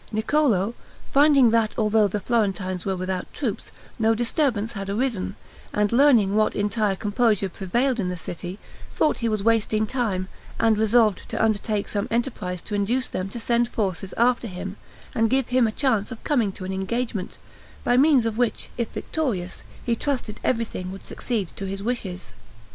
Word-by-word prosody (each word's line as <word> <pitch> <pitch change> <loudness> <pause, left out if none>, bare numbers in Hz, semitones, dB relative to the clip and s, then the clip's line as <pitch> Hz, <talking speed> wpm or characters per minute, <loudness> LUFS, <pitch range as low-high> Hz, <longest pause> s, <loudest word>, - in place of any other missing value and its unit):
Niccolo 220 -3 +2 0.4
finding 275 -4 +6
that, 225 -2 +2
although 215 -1 +3
the 205 +2 -2
Florentines 195 -5 -1
were 190 - +1
without 185 0 -3
troops, 240 -9 -3 0.3
no 225 0 +3
disturbance 235 -2 0
had 195 -2 -5
arisen, 210 -3 -1 0.4
and 210 -1 +1
learning 235 -6 +5
what 215 0 +2
entire 205 0 +1
composure 210 -1 +1
prevailed 240 +8 0
in 185 -3 0
the 180 - -3
city, 175 +3 -6 0.4
thought 305 - +2
he 235 - 0
was 215 -2 -1
wasting 220 -1 +2
time, 210 -6 -1 0.3
and 225 -1 +4
resolved 220 -1 +3
to - - -3
undertake 215 -1 0
some 205 0 -2
other - - -2
enterprise 210 -8 -2
to 210 - -7
induce 225 +6 +1
them 185 +1 -4
to 235 - -6
send 235 +1 +2
forces 195 -5 -2
after 240 0 +3
him, 190 0 -6 0.4
and 225 0 +2
give 265 0 +1
him 250 -2 +4
a - - -1
chance 225 -4 0
of 235 - -8
coming 240 -9 +1
to 190 0 -8
an 190 - -3
engagement, 205 +1 -3 0.5
by 245 - +3
means 270 -2 +5
of 225 0 -2
which, 245 -2 -1
if 235 - 0
victorious, 210 - -3 0.2
he 235 - +2
trusted 245 -5 -3
everything 225 -6 -1
would 195 - -9
succeed 220 -7 -2
to 195 - -6
his 195 +1 -4
wishes. 190 - -4
220 Hz, 175 wpm, -24 LUFS, 195-240 Hz, 0.5 s, finding